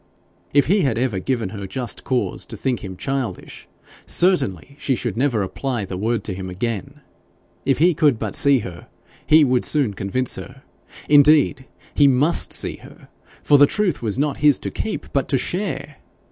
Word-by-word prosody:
If 145 0 +4
he 200 +4 +2
had 130 -8 0
ever 120 -6 0
given 115 -2 -2
her 100 -1 -7
just 125 +4 -4
cause 130 -2 -2
to - - -8
think 130 -3 -2
him 95 -2 -7
childish, 135 0 -5 0.4
certainly 140 - +1
she 135 - 0
should 120 -4 -3
never 120 -4 +1
apply 120 +2 -3
the 95 - -6
word 110 +3 -1
to 100 - -4
him 95 0 -6
again! 115 +9 -4 0.7
If 135 - +3
he 170 +4 +4
could 145 -5 +2
but 110 -2 -4
see 140 -1 +4
her, 85 -2 -9 0.4
he 155 0 +6
would 125 -3 +2
soon 140 -9 0
convince 100 +7 -2
her 135 +2 -10 0.4
indeed 145 -2 +4 0.3
he 145 - +5
MUST 140 +5 +3
see - - -1
her - - -16 0.3
for 145 - +5
the 145 - +7
truth 200 -4 0
was 110 -1 -2
not 145 0 0
his 145 0 +4
to - - -4
keep, 220 - -5
but 140 - 0
to 135 - +2
share! 150 -4 -3
130 Hz, 180 wpm, -21 LUFS, 110-145 Hz, 0.7 s, the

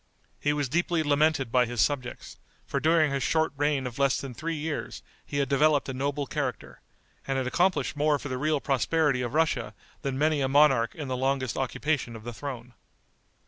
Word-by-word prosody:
He 145 - +1
was 145 -2 -1
deeply 170 +3 +1
lamented 145 -4 +2
by 125 -1 +3
his 120 -1 -5
subjects, 130 -2 -1 0.3
for 140 - -2
during 155 +1 +3
his 140 0 -1
short 160 +4 +1
reign 145 -1 0
of 125 +1 -6
less 140 -1 +3
than 135 -2 -6
three 165 +7 -3
years 155 0 -4 0.2
he 145 - -5
had 140 -1 +1
developed 145 +2 +3
a - - -3
noble 140 +2 -2
character, - - -4 0.5
and 135 -1 0
had 130 - -1
accomplished 155 +1 +1
more 150 0 +2
for 145 - -7
the 130 -2 -3
real 155 +1 +1
prosperity 140 0 +1
of 125 +3 -3
Russia 155 -9 0 0.3
than 135 -1 -2
many 150 0 +2
a 135 - +2
monarch 135 -4 +4
in 150 -3 -5
the 130 - -2
longest 130 -1 -1
occupation 135 -1 -1
of 110 - -10
the 120 +1 -6
throne. 125 -2 -7
140 Hz, 195 wpm, -27 LUFS, 130-150 Hz, 0.5 s, monarch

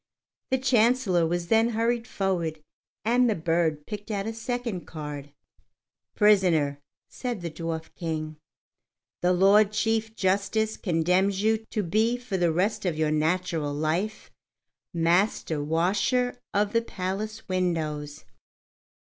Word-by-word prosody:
The 260 - +2
Chancellor 240 -8 +3
was 175 +1 -2
then 225 +1 +4
hurried 235 +1 0
forward, 170 -7 -2 0.4
and 245 +2 +4
the 215 - +1
bird 160 -2 0
picked 210 -1 -7
out 200 -2 -2
a 225 - -3
second 230 -4 -4
card. 150 -2 -7 0.8
"Prisoner," 175 -9 +3 0.3
said 245 -6 -5
the 170 -1 -4
Dwarf 165 0 -5
King, 155 -2 -4 0.8
"the 180 - +3
Lord 195 +3 +5
Chief 220 +1 0
Justice 200 +3 0
condemns 185 +3 +1
you 220 0 +3
to 210 - -1
be 220 +7 +1
for 245 -5 -5
the 175 -3 +2
rest 205 +6 0
of 175 -5 -1
your 155 -1 +1
natural 155 -1 0
life 165 +8 -2 0.6
Master 170 -2 +1
Washer 200 - +1 0.2
of 205 0 +1
the 230 - +3
Palace 215 +1 -5
Windows." 155 -5 -2
190 Hz, 125 wpm, -26 LUFS, 165-220 Hz, 0.8 s, Lord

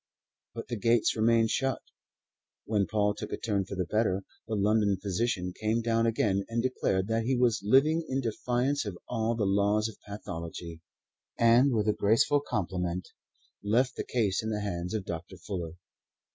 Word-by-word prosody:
But 115 - -6
the 120 - -2
gates 115 +2 +2
remained 115 0 +3
shut. 135 -1 0 0.9
When 105 -3 +1
Paul 105 -1 +1
took 105 - -7
a - - -2
turn 100 -4 -1
for 100 - -6
the 90 -1 -1
better, 100 -1 0 0.2
the 110 - -2
London 105 -1 +2
physician 95 -1 -1
came 110 +3 -1
down 115 0 +2
again 100 -3 +1
and 115 0 -1
declared 95 -7 0
that 115 0 0
he 130 +1 +1
was 120 -2 +2
living 135 +10 +4
in 130 - 0
defiance 125 +3 0
of 100 -5 -6
all 115 -1 0
the 110 -3 0
laws 100 +2 +2
of 110 - -11
pathology, 85 -4 -7 0.6
and 120 +4 +5
with 110 -3 +1
a 105 - +4
graceful 115 +9 +3
compliment 90 -7 -3 0.5
left 120 +5 +2
the - - -3
case 105 -6 0
in 110 - -3
the 105 -1 -2
hands 90 -1 -3
of 105 -3 -3
Dr. 85 +3 -6
Fuller. 85 -2 -5
110 Hz, 175 wpm, -29 LUFS, 95-115 Hz, 0.9 s, and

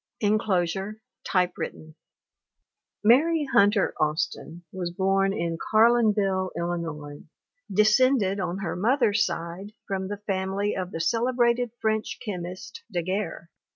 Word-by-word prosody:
[Enclosure. 205 -1 0 0.3
Typewritten] 180 -3 -2 1.1
Mary 295 +8 +4
'Hunter 200 0 +4
Austin 155 +2 -2
was 180 -2 -4
born 195 +2 +1
in 170 -4 -2
Carlinville, 215 -4 +3
Illi 170 0 -1
nois, 150 -3 -7 0.5
descended 215 0 +3
on 180 -1 -2
her 195 -4 -3
mother's 225 +1 +2
side 175 +5 -5
from 190 -2 -3
the 205 +1 -4
family 195 0 -2
of 185 -1 -3
the 165 - -6
celebrated 240 +4 +1
French 220 0 -1
chemist, 185 - -6
Daguerre. 180 -1 -3
195 Hz, 110 wpm, -26 LUFS, 175-215 Hz, 1.1 s, Mary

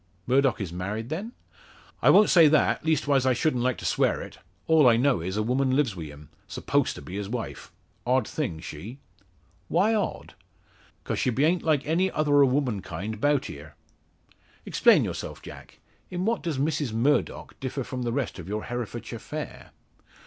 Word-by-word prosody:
"Murdock 135 +1 +2
is 95 -5 -5
married, 105 +6 -4
then?" 195 +10 -4 0.7
"I - - +5
won't 210 - +6
say 170 -4 +7
that 150 0 +2
leastwise 145 -4 +2
I 130 - +4
shouldn't 125 -1 0
like 125 -3 0
to - - -8
swear - - +1
it. - - -9 0.3
All 155 -5 +5
I 115 - +4
know 130 -5 +2
is, 95 +4 -3
a 110 - +1
woman 130 +3 +1
lives 130 -8 +1
wi' 85 -3 -6
him, 75 0 -12 0.2
s'posed - - 0
to - - -10
be 95 - -7
his 100 -1 -4
wife. 120 0 -6 0.3
Odd 130 +1 +1
thing 125 - -3
she." 100 - -8 0.7
"Why 195 - +2
odd?" 210 -3 -2 0.7
"'Cause - - -3
she - - +1
beant 155 +8 +2
like 155 -3 +1
any 175 +5 +1
other 145 -4 +3
o' 140 - +6
womankind 110 -5 -2
'bout 145 -2 +2
here." 75 +1 -10 0.9
"Explain - - +4
yourself, - - -5
Jack. - - -12 0.3
In 180 +1 -3
what 230 +1 0
does 165 -5 -3
Mrs 145 -2 -1
Murdock 135 +6 0
differ 135 0 -3
from 125 +1 -5
the 120 -1 -1
rest 130 -6 -3
of 90 - -8
your 105 +2 -3
Herefordshire 120 -3 -5
fair?" - - -7
130 Hz, 180 wpm, -26 LUFS, 110-150 Hz, 0.9 s, say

